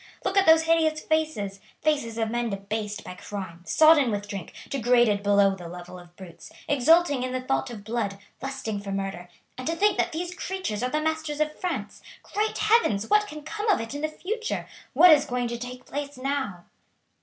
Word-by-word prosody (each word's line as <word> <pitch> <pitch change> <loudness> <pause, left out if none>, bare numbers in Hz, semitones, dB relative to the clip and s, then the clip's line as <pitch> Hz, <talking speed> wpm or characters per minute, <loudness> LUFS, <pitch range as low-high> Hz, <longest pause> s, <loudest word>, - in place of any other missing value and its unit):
Look 385 - 0
at 390 -2 +4
those 320 0 +7
hideous 320 -1 +2
faces 305 -12 -1 0.2
faces 285 -7 0
of 225 -1 -1
men 240 0 -1
debased 210 +1 -4
by - - -7
crime, 185 -3 -7
sodden 310 - +6
with 205 -1 -3
drink, 195 -4 -6 0.2
degraded 240 -5 +3
below 200 -1 +4
the 180 -3 -8
level 180 +1 -9
of 175 0 -16
brutes, 180 -3 -12 0.2
exulting 290 +1 +4
in 255 0 -3
the 255 - -1
thought 265 0 -1
of 220 -4 -8
blood, 215 -3 -2 0.2
lusting 265 -6 -4
for 200 0 -6
murder; 195 -2 -4 0.3
and 255 - -5
to 330 - 0
think 405 +2 +2
that - - +1
these 345 +2 -4
creatures 365 - -4
are 250 - 0
the 305 - 0
masters 315 -1 -2
of 305 0 0
France. 360 -2 -4 0.2
Great 430 +1 -2
Heavens! 425 - +2
What 420 0 +4
can 305 -4 -9
come 420 +8 -3
of 400 - +4
it 225 +3 -5
in 290 - -5
the 310 - +1
future? 440 +8 -4 0.3
What 360 - +8
is 295 -2 +6
going 245 -2 -1
to 235 0 -4
take 250 +1 -8
place 285 -1 -5
now?" 260 -9 -3
255 Hz, 200 wpm, -26 LUFS, 205-315 Hz, 0.3 s, What